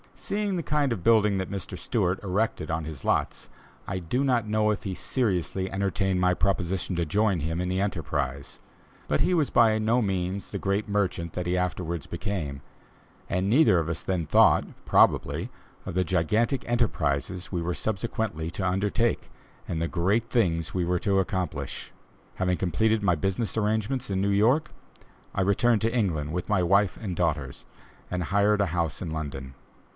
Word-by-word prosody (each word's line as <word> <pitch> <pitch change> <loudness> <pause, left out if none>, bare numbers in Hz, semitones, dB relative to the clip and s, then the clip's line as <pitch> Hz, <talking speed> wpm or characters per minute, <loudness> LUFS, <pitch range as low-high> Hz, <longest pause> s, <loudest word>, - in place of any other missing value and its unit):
Seeing 205 -1 -2
the 170 - -2
kind 145 -3 +1
of 95 -7 -6
building 105 -3 +4
that 95 - -3
Mr. 95 -2 -5
Stewart 95 -2 -1
erected 100 -2 -1
on 80 -1 -2
his 75 -4 -7
lots, - - -1 0.4
I 95 - -2
do 105 +10 -1
not 125 -5 +1
know 105 0 +2
if 105 - -1
he 95 - -3
seriously 95 -6 -1
entertained 95 -1 0
my 90 0 +3
proposition 95 0 -1
to 85 -1 0
join 100 +2 +1
him 80 +3 -2
in 90 - -2
the 95 +1 0
enterprise; 70 -8 -3 0.5
but 75 - +1
he 185 - +2
was 160 -5 +2
by 110 -2 +4
no 115 +3 +2
means 95 -1 -2
the - - -3
great 100 +2 -1
merchant 95 -5 -1
then 90 - -3
he 90 +1 0
afterwards 85 -3 -2
became, 85 -7 -4 0.7
and 90 +1 0
neither 115 - +5
of 80 -1 -2
us 80 - -2
then 90 -4 -1
thought, - - +5 0.2
probably, - - +3 0.4
of - - -5
the 95 - +3
gigantic 105 - 0
enterprises 95 - -1
we 90 -3 -1
were 85 +1 -1
subsequently 105 -6 -2
to 95 +1 -2
undertake, 105 +5 0 0.4
and 80 - -2
the 85 - 0
great 100 +7 0
things 90 -8 +1
we 90 -2 0
were 90 +1 +1
to 100 0 +1
accomplish. 95 -3 -3 0.4
Having 90 -1 0
completed 110 +5 +1
my 90 -4 +3
business 95 +8 -2
arrangements 110 +4 0
in 95 -1 0
New 100 - +1
York, 115 +10 +3 0.6
I - - 0
returned 105 +4 +3
to 115 +2 0
England 80 -10 0
with 90 +4 -3
my 95 -4 +2
wife 100 +2 +3
and 95 -5 -3
daughters, 80 -6 -2 0.4
and 90 -1 -2
hired 100 +4 +2
a 100 - +2
house 85 -3 -2
in 85 - -4
London. 70 -4 -5
95 Hz, 175 wpm, -27 LUFS, 85-110 Hz, 0.7 s, neither